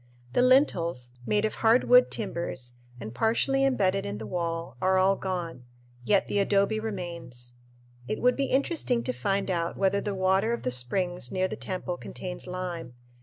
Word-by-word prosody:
The - - +3
lintels, 170 - +2 0.2
made 210 0 +2
of 215 - -1
hard 230 +3 +5
wood 250 0 +6
timbers 130 - -3 0.2
and 110 -1 -7
partially 235 - +2
embedded 195 -8 +2
in 100 +1 -4
the 110 - -7
wall, 165 +2 -3
are 190 0 +3
all 190 +1 +4
gone; 175 -9 -4 0.4
yet 195 +9 +3
the 205 - 0
adobe 200 +2 +2
remains. 170 - -6 0.5
It - - -2
would 250 0 +3
be 275 -1 0
very - - +1
interesting 270 -4 0
to 255 - -2
find 200 -3 -1
out 170 -1 -1
whether 200 +1 +2
the 205 -1 -3
water 190 +4 +2
of 235 - -4
the 125 - -1
springs 130 +5 -1
near 185 0 +1
the - - -5
temple 180 -1 -4
contains 180 0 -7
lime. 180 -8 -5
185 Hz, 175 wpm, -27 LUFS, 170-220 Hz, 0.5 s, wood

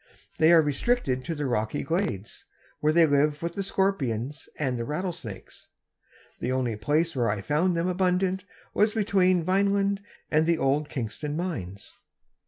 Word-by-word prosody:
They 160 +1 +6
are 165 -2 +7
restricted 145 - 0
to 165 - -3
the 145 -1 -3
rocky 110 -4 -1
glades, 160 - -3 0.3
where 150 - +2
they 165 +1 +6
live 145 +1 +2
with 170 0 -2
the 200 - -3
scorpions 150 - -1
and 135 -4 -1
the - - -1
rattlesnakes. 150 - -6 0.7
The 125 - -2
only 125 -3 0
place 150 +9 0
where 120 -3 +1
I 105 -1 -1
found 170 - +1
them 170 +2 0
abundant 185 +1 +1 0.3
was 210 +1 +2
between 190 -5 +3
Vineland 200 +2 +1 0.3
and 155 +1 +3
the 170 -1 +3
old 145 +1 +1
Kingston 145 +4 -4
mines. 100 - -5
155 Hz, 155 wpm, -27 LUFS, 130-185 Hz, 0.7 s, are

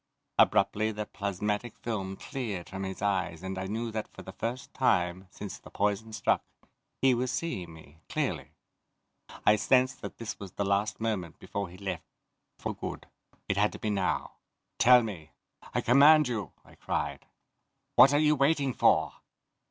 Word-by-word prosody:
Abruptly 110 +1 +4
the 105 0 -4
plasmatic 105 +3 -3
film 95 -5 -3
cleared 105 -10 -5
from 95 0 -6
his 95 +1 -5
eyes 95 -4 0
and 95 0 -4
I 95 - -3
knew 115 +3 -3
that 110 0 -3
for - - -12
the - - -8
first 120 +2 -5
time, 90 -7 +1
since 100 -1 -8
the - - -14
poison 105 +2 -1
struck, 105 -1 +1 0.6
he 135 -1 +6
was 125 +1 0
seeing 95 - -3
me, 80 0 -16
clearly. - - -2 0.9
I 105 - +6
sensed 130 +4 +2
that - - -7
this 115 -2 -6
was 95 -3 -8
the 100 - -2
last 100 +1 0
moment 105 -7 -2
before 100 -2 -4
he 90 - -12
left 95 -3 -4 0.5
for - - -3
good. - - -6 0.4
It 95 - 0
had 105 +1 +3
to - - -7
be 110 - -1
now! 100 -2 -1 0.4
"Tell 125 0 +7
me. 85 -8 -7 0.4
I - - 0
command 145 +4 +7
you," 110 - -3
I - - -18
cried. - - -3 0.7
"What 135 - +9
are 145 - +3
you 150 0 +4
waiting 140 -1 +2
for?" - - +3
105 Hz, 165 wpm, -29 LUFS, 95-120 Hz, 0.9 s, What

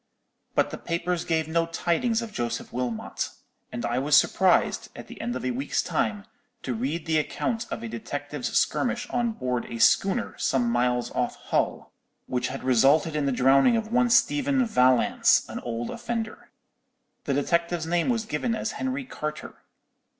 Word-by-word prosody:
"But - - +2
the - - -6
papers 170 0 -2
gave 160 -2 0
no 165 +1 +1
tidings 180 +8 0
of 220 -2 -8
Joseph 120 -4 -3
Wilmot; 120 -2 -3 0.4
and 120 -1 -4
I 120 +1 0
was 145 +2 +3
surprised, - - +3
at - - -9
the - - -10
end 120 - -3
of 130 - -4
a 130 - 0
week's 135 +4 -1
time, 210 -2 -1 0.4
to 130 - -2
read 140 +8 -3
the 160 -1 +2
account 225 +9 -2
of - - -5
a - - -3
detective's 145 +4 -5
skirmish 245 0 0
on 240 -2 0
board 125 - -2
a 115 - -6
schooner 195 - +3
some 120 -3 +1
miles 125 0 +1
off - - -1
Hull, - - -2 0.3
which 125 -1 -1
had 135 0 -6
resulted 135 +5 +3
in 145 -2 0
the - - +2
drowning 135 - +4
of 220 0 -4
one 245 0 +3
Stephen 275 +1 +3
Vallance, 130 - +3
an - - -6
old 120 0 -4
offender. 230 -2 -5 0.8
The 140 - 0
detective's 170 +3 0
name 170 +6 +1
was 230 -3 0
given 230 +1 -1
as 220 - -2
Henry 265 +1 -3
Carter. 150 -10 -6
155 Hz, 170 wpm, -26 LUFS, -, 0.8 s, drowning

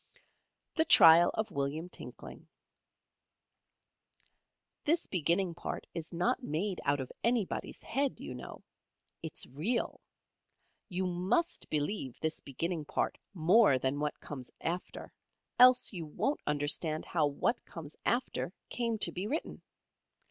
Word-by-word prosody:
THE 320 - +2
TRIAL 170 - +8
OF 220 - -2
WILLIAM 140 +4 -2
TINKLING - - -9 2.4
This 330 +3 +2
beginning 175 +1 +1
part 170 - -5
is 165 -2 -6
not 230 +10 0
made 185 - -2
out 140 0 +2
of 130 - -5
anybody's 235 -4 -1
head, 275 +2 -1
you - - -6
know. - - -9 0.6
It's 160 -2 -5
real. 165 - -2 0.9
You 185 +1 -1
must 185 - 0
believe 145 - -2
this 160 0 -1
beginning 160 +4 -3
part - - -1 0.2
more 180 - +5
than 130 +2 -1
what 150 0 -2
comes 130 -4 -7
after, 175 +2 -4 0.5
else 250 -1 +7
you 170 -4 -5
won't 275 - -1
understand 150 +2 +1
how 155 -4 +1
what 190 - -1
comes 155 -3 -9
after 240 -7 0 0.2
came 230 -2 -1
to - - +4
be 185 +3 -4
written. 300 +8 -3
175 Hz, 125 wpm, -32 LUFS, 150-225 Hz, 2.4 s, TRIAL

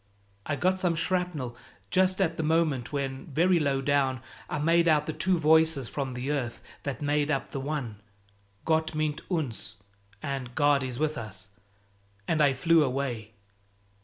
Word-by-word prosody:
"I 145 - 0
got 185 +5 +1
some 180 -3 +1
shrapnel 165 -8 -1 0.4
just 185 0 +3
at 170 -4 +1
the - - -2
moment 155 -5 +1
when, 135 -2 -3
very 170 +5 +3
low 140 -3 +1
down, 135 -2 +1 0.3
I - - -2
made 165 +3 +3
out 150 -2 +4
the 155 - -3
two 175 +4 +1
voices 160 -4 +4
from 135 -2 -4
the 130 +3 -2
earth 125 -5 -2 0.2
that 140 +1 -4
made 145 0 +1
up 135 -3 -1
the 135 - -3
one 135 -7 -4 0.6
'Gott 160 0 +1
mit 155 -1 -1
uns!' 140 - -2 0.5
and 130 -3 -4
'God 145 -1 +4
is 130 -2 -4
with 155 -1 -1
us!' 100 -2 -8 0.8
and 155 -2 +2
I 140 -2 +5
flew 165 +4 +4
away." 125 -5 -3
145 Hz, 165 wpm, -28 LUFS, 130-160 Hz, 0.8 s, I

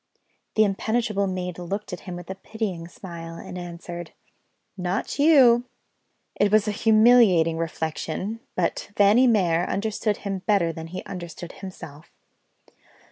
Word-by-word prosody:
The 215 - +6
impenetrable 210 0 0
maid 180 -2 -4
looked 195 +3 -5
at 180 - -5
him 175 - -5
with 175 -1 -9
a - - -2
pitying 195 -4 -5
smile, 170 -2 -9
and 175 - -9
answered: 175 -1 -7 0.6
"Not 185 +8 -3
you!" 260 -6 +6 0.7
It 205 -1 +1
was 215 0 +4
a - - +1
humiliating 215 -7 +5
reflection 165 +6 -3 0.2
but 175 +2 -1
Fanny 210 +6 +5
Mere 180 -7 +3
understood 210 +1 -1
him 195 -1 -2
better 190 -6 +2
than 160 0 -7
he 185 +3 -6
understood 175 -1 -8
himself. 160 -6 -10
190 Hz, 135 wpm, -24 LUFS, 170-215 Hz, 0.7 s, The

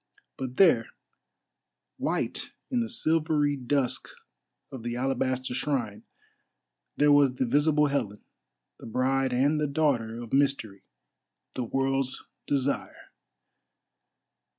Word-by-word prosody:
But 130 -1 -6
there, 195 - +5 1.1
white - - -2 0.2
in 250 - +1
the 230 -1 -1
silvery 155 -7 +1
dusk 135 0 0 0.6
of 130 - -7
the 120 +1 -4
alabaster 130 0 -1
shrine, 120 -6 -2 0.9
there 145 0 +5
was 140 -3 +5
the 130 - 0
visible 150 +4 +3
Helen, 140 -8 -2 0.6
the - - -10
bride 130 +3 +1
and 140 +5 +2
the 150 - +1
daughter 135 -6 0
of 120 -2 -9
Mystery, 135 -8 +1 0.7
the 125 - -3
World's 135 +1 -1 0.2
Desire! 140 0 -2
135 Hz, 105 wpm, -27 LUFS, 125-145 Hz, 1.1 s, there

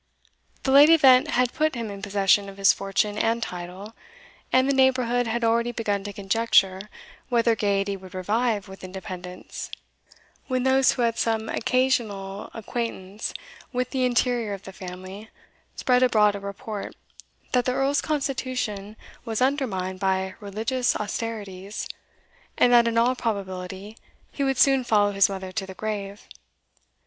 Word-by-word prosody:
The 265 - +1
late 285 +3 +8
event 275 -4 +6
had 250 -3 +1
put 310 -2 +1
him 230 -3 -4
in 200 -1 -8
possession 200 0 +2
of 195 - -12
his 195 0 +5
fortune 205 +2 -1
and 230 +1 +1
title, 180 +4 -7 0.6
and 260 +1 +4
the 280 - +2
neighbourhood 255 -2 +2
had 235 +1 -1
already 235 +1 +2
begun 205 -4 -2
to 205 - -4
conjecture 200 -1 +1 0.4
whether 235 -2 +3
gaiety 200 -1 0
would 185 -1 -12
revive 210 +2 0
with 190 0 -12
independence, 185 -1 -7 0.8
when 255 -1 0
those 265 0 +4
who 245 - -1
had 230 -1 0
some 225 -1 0
occasional 220 -6 -1
acquaintance 220 -3 -4 0.4
with 250 -1 -2
the 260 -2 0
interior 240 -3 +1
of 200 -1 -7
the 195 - -10
family 185 +3 -9 0.5
spread 250 -1 +2
abroad 215 -5 +4
a 200 - -5
report, 200 +1 -6 0.6
that 250 -1 +2
the 250 - +1
Earl's 275 +2 +1
constitution 255 -8 -3 0.3
was 225 -3 -3
undermined 220 -9 -1
by 190 0 0
religious 220 +5 -1
austerities, 205 -2 -5 0.7
and 245 - +4
that 235 -1 +6
in 230 0 0
all 240 +2 +4
probability 195 -2 -4 0.4
he 280 - -3
would 270 -1 +1
soon 270 -1 +4
follow 205 -3 +3
his 195 0 +4
mother 190 -1 -5
to 195 0 -4
the 190 - -9
grave. 205 -1 -5
220 Hz, 150 wpm, -25 LUFS, 195-250 Hz, 0.8 s, late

